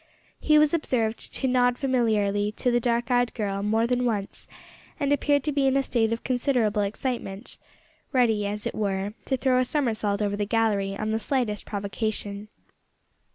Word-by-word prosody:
He 305 Hz, -1 st, +4 dB
was 300 Hz, 0 st, +4 dB
observed 230 Hz, -9 st, -1 dB
to 265 Hz, -, 0 dB
nod 245 Hz, -1 st, +3 dB
familiarly 215 Hz, -6 st, +1 dB
to 245 Hz, -, 0 dB
the 240 Hz, -, +3 dB
dark 240 Hz, 0 st, 0 dB
eyed 245 Hz, 0 st, +3 dB
girl 200 Hz, -3 st, -2 dB
more 220 Hz, +3 st, +1 dB
than 250 Hz, +1 st, 0 dB
once, 210 Hz, -5 st, -3 dB, 0.5 s
and 285 Hz, 0 st, +2 dB
appeared 285 Hz, -1 st, +2 dB
to 300 Hz, -, -1 dB
be 280 Hz, -1 st, +2 dB
in 265 Hz, +1 st, +3 dB
a 275 Hz, -, +2 dB
state 225 Hz, -4 st, +1 dB
of 230 Hz, -, -2 dB
considerable 245 Hz, -4 st, +1 dB
excitement 210 Hz, 0 st, -4 dB, 0.5 s
ready, 225 Hz, -6 st, +2 dB
as 210 Hz, +1 st, -4 dB
it -, -, -2 dB
were, 200 Hz, -1 st, -2 dB
to 265 Hz, -, 0 dB
throw 255 Hz, -1 st, +2 dB
a -, -, +3 dB
somersault 225 Hz, -7 st, 0 dB
over 205 Hz, -1 st, 0 dB
the 205 Hz, 0 st, -1 dB
gallery 205 Hz, -3 st, +1 dB
on 215 Hz, +1 st, -2 dB
the 220 Hz, -, 0 dB
slightest 230 Hz, -4 st, -1 dB
provocation. 205 Hz, 0 st, -3 dB
225 Hz, 175 wpm, -26 LUFS, 205-255 Hz, 0.5 s, He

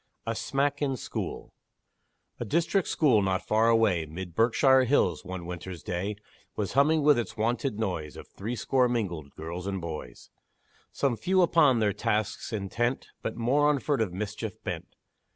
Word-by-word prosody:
A 115 Hz, -, -1 dB
SMACK 140 Hz, +4 st, -1 dB
IN 135 Hz, -3 st, 0 dB
SCHOOL 90 Hz, -, -5 dB, 0.9 s
A 120 Hz, -, -3 dB
district 170 Hz, -, +1 dB
school, 130 Hz, -9 st, +3 dB
not 95 Hz, -1 st, 0 dB
far 110 Hz, +2 st, +3 dB
away, 105 Hz, -8 st, +3 dB
'Mid 85 Hz, +3 st, -7 dB
Berkshire's 130 Hz, -, +4 dB
hills, 90 Hz, -, +2 dB
one 90 Hz, -1 st, -6 dB
winter's 90 Hz, 0 st, -7 dB
day, 95 Hz, +4 st, -3 dB, 0.4 s
Was 105 Hz, -2 st, -2 dB
humming 150 Hz, +3 st, +4 dB
with 145 Hz, -4 st, +5 dB
its 115 Hz, -, -5 dB
wonted 120 Hz, +2 st, 0 dB
noise 90 Hz, -9 st, -3 dB
Of -, -, -10 dB
threescore 125 Hz, +4 st, 0 dB
mingled 90 Hz, -11 st, -2 dB
girls 85 Hz, +4 st, -6 dB
and 95 Hz, -1 st, -2 dB
boys; 75 Hz, -8 st, -7 dB, 0.6 s
Some 135 Hz, -4 st, 0 dB
few 185 Hz, +4 st, +3 dB
upon 155 Hz, -7 st, +4 dB
their 105 Hz, -3 st, +2 dB
tasks 105 Hz, +3 st, -1 dB
intent, 115 Hz, +4 st, -2 dB
But 110 Hz, -, -3 dB
more 135 Hz, +6 st, +3 dB
on 150 Hz, -, +3 dB
furtive 130 Hz, -7 st, 0 dB
mischief 105 Hz, +2 st, -4 dB
bent. -, -, -5 dB
110 Hz, 155 wpm, -28 LUFS, 95-135 Hz, 0.9 s, with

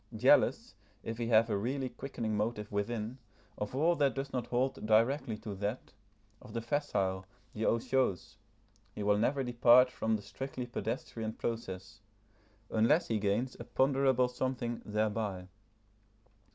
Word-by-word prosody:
Jealous, -, -, +4 dB, 0.3 s
if 115 Hz, +1 st, -5 dB
he 115 Hz, -, -1 dB
have 115 Hz, -1 st, +5 dB
a 105 Hz, -, 0 dB
really 130 Hz, +6 st, -1 dB
quickening 120 Hz, -3 st, -4 dB
motive 105 Hz, 0 st, -2 dB
within, 110 Hz, +4 st, -3 dB, 0.4 s
of 105 Hz, +4 st, -4 dB
all 165 Hz, +5 st, +3 dB
that 140 Hz, -4 st, +2 dB
does 135 Hz, 0 st, -4 dB
not 125 Hz, -3 st, -2 dB
hold 130 Hz, +2 st, -1 dB
directly 115 Hz, +2 st, +2 dB
to 105 Hz, -1 st, -6 dB
that, 100 Hz, +4 st, -4 dB, 0.5 s
of 125 Hz, -4 st, -12 dB
the 115 Hz, -, -2 dB
facile, 100 Hz, -9 st, -1 dB, 0.3 s
the 110 Hz, -, -2 dB
otiose, 115 Hz, -4 st, 0 dB, 0.6 s
he 105 Hz, -, -4 dB
will 105 Hz, 0 st, +3 dB
never 135 Hz, +5 st, +1 dB
depart 125 Hz, +1 st, +5 dB
from 110 Hz, -2 st, 0 dB
the 105 Hz, -, -5 dB
strictly 125 Hz, +5 st, -5 dB
pedestrian 110 Hz, -1 st, -4 dB
process, 110 Hz, -3 st, -5 dB, 0.7 s
unless 130 Hz, +10 st, +3 dB
he 110 Hz, -2 st, +1 dB
gains 105 Hz, +6 st, 0 dB
a -, -, -5 dB
ponderable 130 Hz, -1 st, +2 dB
something 125 Hz, -1 st, -3 dB
thereby. 105 Hz, -3 st, -2 dB
115 Hz, 140 wpm, -32 LUFS, 105-130 Hz, 0.7 s, have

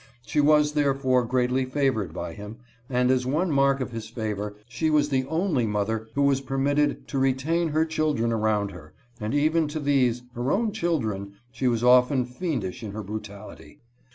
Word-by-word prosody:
She 150 Hz, -, +1 dB
was 150 Hz, 0 st, +4 dB
therefore 135 Hz, -4 st, +2 dB
greatly 125 Hz, +2 st, +1 dB
favored 130 Hz, -, 0 dB
by 80 Hz, -, -5 dB
him 105 Hz, +4 st, -9 dB, 0.2 s
— 120 Hz, -, -33 dB
and 125 Hz, 0 st, +2 dB
as 130 Hz, -1 st, +1 dB
one 160 Hz, +6 st, 0 dB
mark 135 Hz, -1 st, +3 dB
of 130 Hz, -, -3 dB
his 115 Hz, -2 st, -6 dB
favor 105 Hz, -3 st, -4 dB
she 155 Hz, +6 st, -1 dB
was 150 Hz, -1 st, +2 dB
the 130 Hz, -2 st, 0 dB
only 160 Hz, -, 0 dB
mother 110 Hz, +2 st, -1 dB
who 140 Hz, -, +2 dB
was 140 Hz, -1 st, +3 dB
permitted 140 Hz, +2 st, 0 dB
to 135 Hz, -, -1 dB
retain 135 Hz, +6 st, +1 dB
her 155 Hz, +1 st, +2 dB
children 150 Hz, -7 st, 0 dB
around 105 Hz, -2 st, 0 dB
her, 80 Hz, -4 st, -13 dB, 0.2 s
and 110 Hz, +5 st, -2 dB
even 155 Hz, +2 st, +2 dB
to 155 Hz, +1 st, -4 dB
these, 130 Hz, -4 st, +1 dB
her 120 Hz, +3 st, -2 dB
own 220 Hz, +1 st, +1 dB
children, 115 Hz, -, -2 dB, 0.2 s
she 130 Hz, -, -1 dB
was 120 Hz, -1 st, +1 dB
often 125 Hz, +1 st, +5 dB
fiendish 125 Hz, -, -4 dB
in 105 Hz, -3 st, -6 dB
her 110 Hz, 0 st, -5 dB
brutality. 105 Hz, +5 st, -9 dB
130 Hz, 180 wpm, -25 LUFS, 110-145 Hz, 0.2 s, often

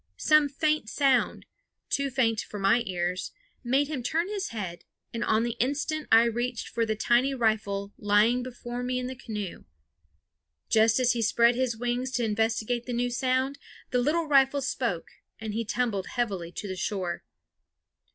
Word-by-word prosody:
Some 305 Hz, -2 st, +4 dB
faint 305 Hz, -4 st, 0 dB
sound, 270 Hz, -3 st, +1 dB, 0.5 s
too 280 Hz, 0 st, +1 dB
faint 230 Hz, -4 st, +1 dB
for 210 Hz, -, -8 dB
my 195 Hz, +4 st, +3 dB
ears, 180 Hz, 0 st, -2 dB, 0.3 s
made 270 Hz, +4 st, +2 dB
him 290 Hz, -4 st, -3 dB
turn 330 Hz, +9 st, -1 dB
his 410 Hz, -2 st, -2 dB
head, 190 Hz, -6 st, -6 dB, 0.3 s
and 230 Hz, -, -2 dB
on 220 Hz, +1 st, +2 dB
the 235 Hz, -1 st, -2 dB
instant 290 Hz, +4 st, -1 dB
I 225 Hz, +1 st, +8 dB
reached 240 Hz, +1 st, -2 dB
for 230 Hz, -1 st, -1 dB
the 220 Hz, -, 0 dB
tiny 240 Hz, +5 st, +2 dB
rifle 205 Hz, -4 st, 0 dB
lying 210 Hz, +4 st, +3 dB
before 245 Hz, -1 st, -6 dB
me 250 Hz, 0 st, -1 dB
in 250 Hz, -, -2 dB
the 260 Hz, +1 st, -5 dB
canoe. 210 Hz, -7 st, -6 dB, 1.0 s
Just 225 Hz, +2 st, +4 dB
as 250 Hz, -1 st, +4 dB
he 235 Hz, -, -2 dB
spread 235 Hz, +2 st, +4 dB
his 245 Hz, -2 st, -1 dB
wings 245 Hz, +2 st, -1 dB
to 240 Hz, -, +1 dB
investigate 225 Hz, +2 st, 0 dB
the 245 Hz, -, -3 dB
new 245 Hz, +1 st, 0 dB
sound, 260 Hz, +2 st, 0 dB, 0.3 s
the 250 Hz, -, +2 dB
little 310 Hz, +6 st, +1 dB
rifle 275 Hz, -1 st, +4 dB
spoke, 235 Hz, -10 st, -2 dB, 0.3 s
and 220 Hz, -2 st, -5 dB
he 230 Hz, +2 st, -1 dB
tumbled 215 Hz, -4 st, -1 dB
heavily 195 Hz, -9 st, -2 dB
to 205 Hz, -, -5 dB
the 190 Hz, -, -4 dB
shore. 185 Hz, -2 st, -3 dB
240 Hz, 170 wpm, -27 LUFS, 220-260 Hz, 1.0 s, I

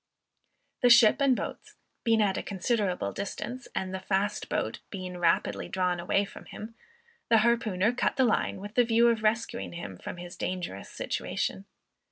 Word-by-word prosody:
The 245 Hz, -, +5 dB
ship 235 Hz, +1 st, +7 dB
and 270 Hz, -2 st, +5 dB
boats -, -, -6 dB, 0.3 s
being 225 Hz, -2 st, +4 dB
at 195 Hz, -2 st, +1 dB
a -, -, -2 dB
considerable 195 Hz, -, -1 dB
distance, 245 Hz, -, -5 dB
and 190 Hz, 0 st, -2 dB
the 190 Hz, -, -2 dB
fast 195 Hz, +2 st, -1 dB
boat -, -, -2 dB
being 185 Hz, -2 st, -6 dB
rapidly 170 Hz, -1 st, +1 dB
drawn 180 Hz, -2 st, 0 dB
away 195 Hz, +3 st, +1 dB
from -, -, -12 dB
him, 220 Hz, +2 st, -9 dB, 0.6 s
the 230 Hz, -, +6 dB
harpooner 220 Hz, -3 st, +2 dB
cut 245 Hz, -, 0 dB
the 260 Hz, -, +4 dB
line 220 Hz, -4 st, +1 dB
with 205 Hz, +2 st, -8 dB
the 245 Hz, -, +5 dB
view 230 Hz, 0 st, +4 dB
of 230 Hz, -2 st, +1 dB
rescuing 225 Hz, +1 st, -1 dB
him 95 Hz, -, -7 dB
from -, -, -7 dB
his 175 Hz, +1 st, -8 dB
dangerous 180 Hz, -, -4 dB
situation. 95 Hz, +1 st, -3 dB
205 Hz, 170 wpm, -28 LUFS, 180-230 Hz, 0.6 s, ship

